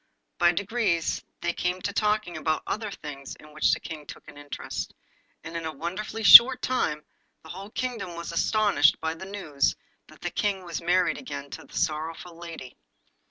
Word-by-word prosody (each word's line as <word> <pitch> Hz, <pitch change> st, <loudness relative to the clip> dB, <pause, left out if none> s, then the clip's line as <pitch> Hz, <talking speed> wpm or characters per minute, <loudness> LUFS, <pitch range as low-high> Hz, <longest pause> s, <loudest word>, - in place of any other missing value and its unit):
By 175 Hz, -1 st, +5 dB
degrees 200 Hz, -3 st, -1 dB, 0.2 s
they 175 Hz, -, -1 dB
came 180 Hz, +1 st, -2 dB
to 200 Hz, -, -2 dB
talking 210 Hz, -4 st, 0 dB
about 155 Hz, 0 st, -1 dB
other 215 Hz, 0 st, -3 dB
things 140 Hz, -7 st, -8 dB
in 150 Hz, 0 st, -16 dB
which 155 Hz, -, +2 dB
the -, -, +1 dB
King 150 Hz, -3 st, -9 dB
took -, -, -11 dB
an -, -, -12 dB
interest, 145 Hz, 0 st, -6 dB, 0.5 s
and 165 Hz, +1 st, -8 dB
in 165 Hz, -, -3 dB
a 160 Hz, -, -3 dB
wonderfully 185 Hz, +9 st, -5 dB
short 250 Hz, +5 st, +10 dB
time 150 Hz, -12 st, -1 dB, 0.4 s
the 160 Hz, -, -14 dB
whole 195 Hz, +4 st, -8 dB
kingdom 230 Hz, -7 st, -4 dB
was 170 Hz, 0 st, -6 dB
astonished 170 Hz, -4 st, +3 dB
by 160 Hz, 0 st, -2 dB
the 190 Hz, +4 st, -9 dB
news 155 Hz, -9 st, -1 dB, 0.3 s
that -, -, -18 dB
the -, -, -3 dB
King 200 Hz, -2 st, -1 dB
was 170 Hz, -1 st, -5 dB
married 180 Hz, +2 st, +1 dB
again 140 Hz, -, -7 dB
to -, -, -8 dB
the -, -, -10 dB
sorrowful 160 Hz, +3 st, -3 dB
lady. 165 Hz, -7 st, -9 dB
170 Hz, 180 wpm, -26 LUFS, 155-205 Hz, 0.5 s, short